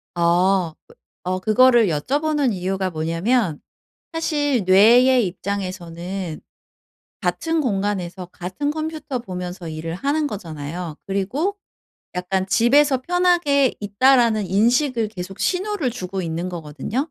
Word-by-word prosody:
어. 175 0 +2 0.5
어 185 +1 -1
그거를 235 +3 +5
여쭤보는 280 - 0
이유가 190 0 -2
뭐냐면 165 +4 0 0.5
사실 290 -6 0
뇌의 235 +5 +6
입장에서는 185 -2 -5 0.8
같은 325 -1 0
공간에서 195 - -2
같은 185 +12 -4
컴퓨터 310 -3 -3
보면서 180 -4 -6
일을 160 +1 -5
하는 290 - 0
거잖아요. 165 - -6
그리고 255 - -1 0.6
약간 185 +1 -1
집에서 260 +6 +3
편하게 345 -6 +2
있다라는 220 0 +3
인식을 230 - +2
계속 195 -2 -8
신호를 375 -7 0
주고 190 -4 -5
있는 170 +1 -3
거거든요. 175 - -4
200 Hz, 270 characters per minute, -21 LUFS, 180-270 Hz, 0.8 s, 뇌의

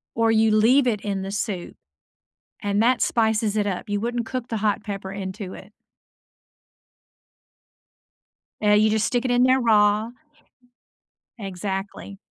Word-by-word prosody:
or 225 0 +2
you 220 0 +3
leave 240 +6 +4
it 215 -5 0
in 200 -2 -3
the 195 - -5
soup 200 -3 -4 0.9
and 205 +1 +1
that 250 +1 +2
spices 220 -2 +1
it 210 -1 +1
up. 200 +3 -4
You 205 0 -1
wouldn't 235 +1 -2
cook 250 0 -5
the 225 - -2
hot 210 0 -1
pepper 195 -2 -6
into 190 0 -6
it. 200 +3 -13 2.9
Eh, 210 -1 +3
you 215 +1 +4
just 215 0 +1
stick 245 -1 0
it 255 - -1
in 245 0 +3
there 260 +1 +4
raw 215 -2 +3 1.3
Exactly. 195 0 -6
215 Hz, 140 wpm, -23 LUFS, 200-230 Hz, 2.9 s, leave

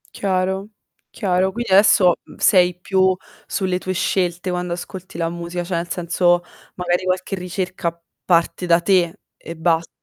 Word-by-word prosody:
Chiaro, 190 +1 -1 0.4
chiaro. 190 -2 +1
Quindi 240 0 -4
adesso 190 -2 +6 0.2
sei 180 -3 +4
più 190 0 +2 0.3
sulle 185 -2 -1
tue 185 0 -3
scelte 180 0 -1
quando 180 -1 -2
ascolti 180 0 -8
la 165 -1 0
musica, 170 +1 -4
cioè 175 0 -3
nel 170 0 -2
senso, 175 0 +2 0.3
magari 180 0 0
qualche 185 +1 -1
ricerca 180 -2 -4 0.3
parte 170 0 +2
da 170 -1 +4
te 180 0 +2 0.2
e 165 - -9
basta. 165 0 +1
180 Hz, 145 wpm, -20 LUFS, 175-190 Hz, 0.4 s, adesso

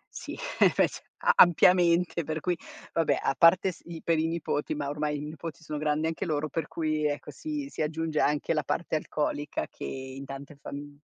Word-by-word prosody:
Sì, - - -6 0.4
invece - - +2 0.2
a - - +6
ampiamente 175 -1 +5
per 155 +1 -3
cui 180 +2 0 0.4
vabbè, 165 -2 +2
a - - +1
parte 180 +3 +6
s - - -16
i 170 -1 -8
per 165 -2 +2
i 160 - +1
nipoti, 155 -2 -2
ma 145 -1 -3
ormai 150 0 -1
i - - -5
nipoti 155 0 -7
sono 150 -1 -4
grandi 150 +1 +1
anche 165 0 -2
loro, 155 -2 -1
per 160 -3 -2
cui 155 -2 0
ecco, 145 0 -4
si 300 -3 -4
si - - -4
aggiunge 155 0 -1
anche 150 +2 +2
la 150 - +1
parte 165 -1 -1
alcolica 150 -1 -2
che - - -11
in 130 +1 -6
tante 140 +2 -8
fami 145 0 -8
155 Hz, 195 wpm, -28 LUFS, 145-165 Hz, 0.4 s, a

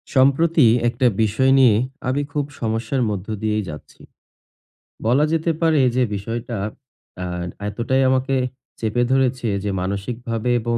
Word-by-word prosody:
সম্প্রতি 140 +2 +4 0.2
একটা 125 +2 +2 0.2
বিষয় 130 +6 +2
নিয়ে 120 -5 +6 0.3
আমি 135 +3 +1
খুব 145 -1 -1 0.2
সমস্যার 115 +3 -1
মধ্য 100 -2 -4
দিয়েই 110 -1 0
যাচ্ছি। 75 -1 -11 1.1
বলা 130 +6 +4
যেতে 165 +1 +1
পারে 160 -2 +3 0.2
যে, 130 - +3
বিষয়টা 115 +3 -4 0.6
অ্যা 90 0 -4 0.4
এতটাই 120 +5 0
আমাকে 130 +1 +1 0.4
চেপে 115 +2 0
ধরেছে 130 -2 +1 0.2
যে, 105 - -1
মানসিকভাবে 115 +5 -3
এবং 120 +1 -1
120 Hz, 130 wpm, -21 LUFS, 110-135 Hz, 1.1 s, নিয়ে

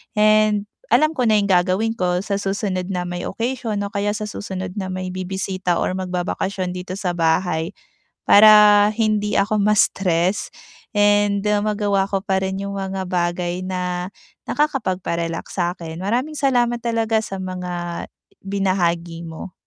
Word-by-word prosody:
and 215 -1 +4 0.3
alam 310 +5 +5
ko 255 -7 0
na 215 - +4
'yong 200 -1 +2
gagawin 185 +5 +2
ko 180 0 0
sa 200 -1 -2
susunod 195 -2 -2
na 180 -2 -2
may 175 0 -4
occasion 235 -1 -3
o 200 - -5
kaya 205 0 -1
sa 215 - -4
susunod 190 -3 -5
na 190 - -3
may 185 0 -4
bibisita 185 -1 -2
or - - 0
magbabakasyon 180 +1 -2
dito 180 +1 -6
sa 190 -3 -2
bahay, 165 +1 0 0.5
para 210 0 +8
hindi 215 -2 0
ako 210 +2 +1
ma-stress 190 -3 +1 0.4
and 205 -1 +3 0.2
magawa 205 -2 +1
ko 195 -1 0
pa 190 0 -1
rin 190 0 -3
'yong 200 0 -4
mga 190 -1 -4
bagay 175 0 -1
na 180 0 -3 0.3
nakakapagpa-relax 185 - -2
sa 175 -1 +1
'kin. 165 -3 -8
Maraming 255 +9 -1
salamat 240 -4 +1
talaga 225 -1 +1
sa 195 -1 -6
mga 180 -2 -4 0.4
binahagi 175 -4 -1
mo. 165 +2 -8
195 Hz, 145 wpm, -21 LUFS, 180-210 Hz, 0.5 s, para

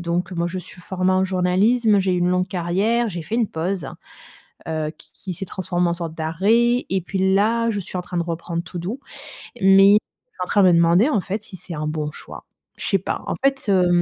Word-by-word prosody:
donc 175 +1 -2
moi, 170 0 -1
je 185 +2 -4
suis 180 +1 -11
formée 185 +1 0
en 185 0 +2
journalisme, 195 +4 +2
j'ai 190 -1 +1
eu - - 0
une 175 0 +2
longue 180 +1 +1
carrière, 195 +7 0
j'ai 175 -4 -5
fait 160 - -5
une 230 -3 +1
pause, 170 -2 -3 0.8
heu, 155 -1 -2
qui - - -17
qui 185 -2 -7
s'est 190 +3 -5
transformée 180 -1 -1
en 170 - 0
sorte 170 -2 -5
d'arrêt. 210 +10 +2
Et 190 0 +1
puis 190 0 +1
là, 230 +3 +2
je 205 -2 -2
suis 185 0 -7
en 180 - -2
train 175 0 -4
de - - +1
reprendre 170 0 -4
tout 175 0 -8
doux. 205 +10 -4 0.6
Mais, 195 +1 +7
suis 215 - -3
en - - -2
train 205 - +3
de - - +7
me - - +4
demander 170 - +4
en 215 -10 +1
fait 200 +4 -4
si 210 -2 -11
c'est 180 -1 -7
un 150 0 -3
bon 150 -1 -3
choix. - - -10 0.3
Je - - -5
sais 195 - +3
pas. 190 - -4
En - - -1
fait, 270 -5 +1
hem 180 -2 +4
185 Hz, 235 wpm, -22 LUFS, 170-200 Hz, 0.8 s, Mais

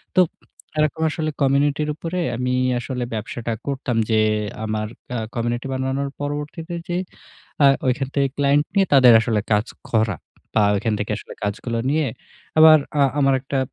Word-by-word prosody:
তো 185 - +7 0.6
এরকম 155 +1 +1
আসলে 155 +1 -2
কমিউনিটির 140 +2 +2
উপরে 170 +3 -4 0.2
আমি 125 0 -1 0.3
আসলে 125 0 -4
ব্যবসাটা 115 +1 -4 0.2
করতাম। 135 -4 -2
যে 110 - +4 0.5
আমার 110 0 -2 0.3
আ - - -1 0.2
কমিউনিটি 120 +2 -2
বানানোর 130 +1 -2
পরবর্তীতে 150 +4 -4 0.2
যে 175 - 0 0.7
আ - - +8 0.2
ঐখান 130 +1 0
থেকে 140 -1 +3
ক্লায়েন্ট 145 +1 +3
নিয়ে 195 -1 +4
তাদের 130 -4 +8
আসলে 110 -3 0
কাজ 105 +3 +2 0.2
করা। 110 -4 +1 0.4
বা 110 - +3
ওইখান 110 +2 0
থেকে 105 +1 -3
আসলে - - -10
কাজগুলো 115 +3 -2
নিয়ে 155 0 +1 0.5
আবার 155 0 +9 0.2
আ - - +7 0.2
আমার 135 -1 +4
একটা 135 0 -2
135 Hz, 155 wpm, -22 LUFS, 115-145 Hz, 0.7 s, আবার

